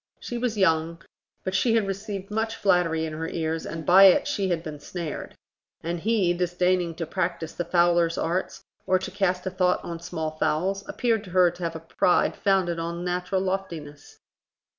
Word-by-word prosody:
She 240 - -5
was 235 -3 -1
young, 165 -3 +2 0.4
but 190 - -3
she 225 +4 +2
had 220 -3 +2
received 195 0 -5
much 220 +1 -1
flattery 175 -5 +2
in 155 - -5
her 160 +1 -4
ears, 160 0 -3
and 160 0 -6
by 190 +2 +8
it 190 - +6
she 195 -2 -1
had 170 -2 -1
been 150 -3 -7
snared; 165 +1 -6 0.5
and 170 +1 -2
he, 200 -2 +2
disdaining 180 -1 0
to 165 - -3
practise 170 -1 -3
the 175 - -3
fowler's 170 -1 +3
arts 185 +3 -2 0.2
or 185 0 +4
to 185 - -6
cast 185 -2 0
a 185 - -2
thought 180 -1 +2
on 170 -1 -5
small 165 -2 -4
fowls, 185 +5 -1
appeared 230 -4 0
to - - -11
her 180 -1 +4
to 175 +1 -14
have 165 -1 -2
a - - -4
pride 165 +2 +1
founded 185 -4 +1
on 170 +1 -4
natural 180 +1 -1
loftiness. 170 -7 -5
180 Hz, 185 wpm, -25 LUFS, 165-195 Hz, 0.5 s, by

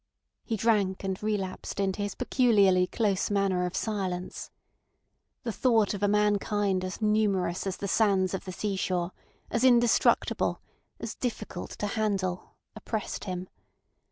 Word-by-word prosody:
He 225 - -2
drank 200 -4 +1
and 190 -1 -3
relapsed 205 -3 -3
into 195 0 0
his 205 0 -3
peculiarly 205 -8 +3
close 200 -2 0
manner 195 -3 +1
of 180 - -6
silence. 190 -4 -3 0.9
The 235 - -2
thought 225 -3 +2
of 200 - -5
a 205 - +3
mankind 205 -2 +1
as 185 +4 -5
numerous 200 -4 +1
as 190 - -2
the 200 - -4
sands 195 -3 +2
of 190 - -4
the 185 - -5
sea 200 +2 -2
shore, 180 -1 -1 0.4
as 230 - 0
indestructible, 240 -2 +3 0.4
as - - -4
difficult 215 -7 -4
to - - -2
handle, 200 -4 -2 0.2
oppressed 220 -2 -4
him. 185 -1 -4
200 Hz, 140 wpm, -28 LUFS, 185-215 Hz, 0.9 s, peculiarly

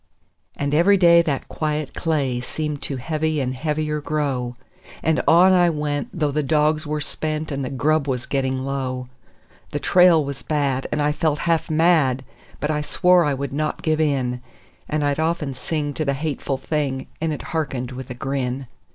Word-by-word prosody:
And 140 0 -2
every 180 +6 +5
day 170 -2 +7
that 145 -6 -2
quiet 150 -1 -2
clay 140 -6 0
seemed 150 +3 -4
to 140 - -3
heavy 155 +3 -1
and 130 -2 -1
heavier 150 +2 -2
grow; 135 -5 -2 0.5
And 160 0 +2
on 180 +3 +7
I 175 -1 +5
went, 150 -2 -2
though 150 -4 -1
the 150 +2 0
dogs 155 +2 +1
were 150 0 -1
spent 155 +1 -3
and 140 -1 -2
the 130 - -3
grub 145 +2 +1
was 125 -2 -1
getting 130 -1 -1
low; 130 -2 -3 0.6
The - - -3
trail 175 -4 +5
was 140 -1 -5
bad, 140 -4 -1
and 150 - 0
I 150 - +2
felt 150 0 0
half 165 -1 +1
mad, 155 -5 +3 0.4
but 150 - -1
I 150 -1 0
swore 180 +3 +3
I 145 -2 +1
would 140 +1 -4
not 150 +1 -2
give 155 0 +1
in; 130 -5 0 0.5
And 150 -1 0
I'd 145 +1 0
often 160 -3 0
sing 145 +3 -3
to 155 - -2
the 140 -2 0
hateful 140 -2 -2
thing, 135 -1 -2 0.2
and 160 -1 0
it 150 - -4
hearkened 135 -6 -2
with 130 0 -7
a 125 - -5
grin. 135 0 -2
150 Hz, 185 wpm, -22 LUFS, 135-155 Hz, 0.6 s, day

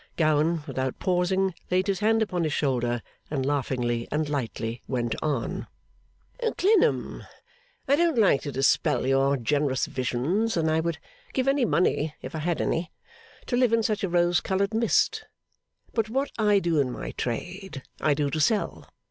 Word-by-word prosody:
Gowan, 155 0 +2
without 130 -3 -3
pausing, 185 +1 +1 0.2
laid 185 +1 +2
his 195 -2 0
hand 225 +1 +3
upon 180 -5 -2
his 155 -2 -1
shoulder, 120 -4 0 0.3
and 135 -3 -1
laughingly 125 -4 -1
and 150 +1 0
lightly 120 -4 -3
went 120 -3 -1
on: 140 -6 -2 0.9
'Clennam, 400 0 +2 0.6
I 280 +2 +4
don't 335 -4 +2
like 195 -11 +4
to 145 - -5
dispel 135 -1 +2
your 135 +1 +3
generous 135 +1 0
visions, 155 - -1
and 160 -1 +1
I 160 - +2
would 165 0 -1 0.4
give 260 0 0
any 275 -2 +3
money 160 -6 +1
(if 130 - -8
I 160 - -3
had 170 +2 -1
any), 165 0 -1 0.5
to 245 - -1
live 245 -2 +3
in 230 -1 +3
such 215 -1 -1
a 195 - 0
rose 175 0 +3
coloured 195 +2 0
mist. 225 +1 +2 0.7
But 220 -2 0
what 270 +4 -1
I 210 -2 +4
do 170 -5 +1
in 130 -3 +1
my - - -5
trade, 175 - -5 0.2
I 150 -2 +2
do 145 -1 0
to 155 - -1
sell. 205 +7 0
160 Hz, 165 wpm, -26 LUFS, 135-200 Hz, 0.9 s, I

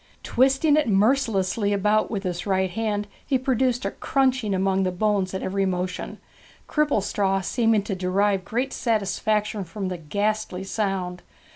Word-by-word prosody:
Twisting 270 +4 +3
it 300 -4 +2
mercilessly 205 -2 +2
about 210 +2 +2
with 205 -3 -3
his 180 0 -3
right 190 -1 +1
hand 210 0 -2 0.2
he 270 - +1
produced 255 -1 0
a - - -1
crunching 260 -7 0
among 190 0 +1
the 185 -1 +1
bones 195 0 0
at 190 - -3
every 195 +1 0
motion, 180 0 -3 0.5
Cripplestraw 200 -9 +1
seeming 225 0 +2
to 205 - -3
derive 190 +1 +1
great 245 +7 -2
satisfaction 210 -1 0
from 190 +2 -5
the 180 - -4
ghastly 200 +3 -2
sound. 195 -3 -2
205 Hz, 145 wpm, -24 LUFS, 190-225 Hz, 0.5 s, Twisting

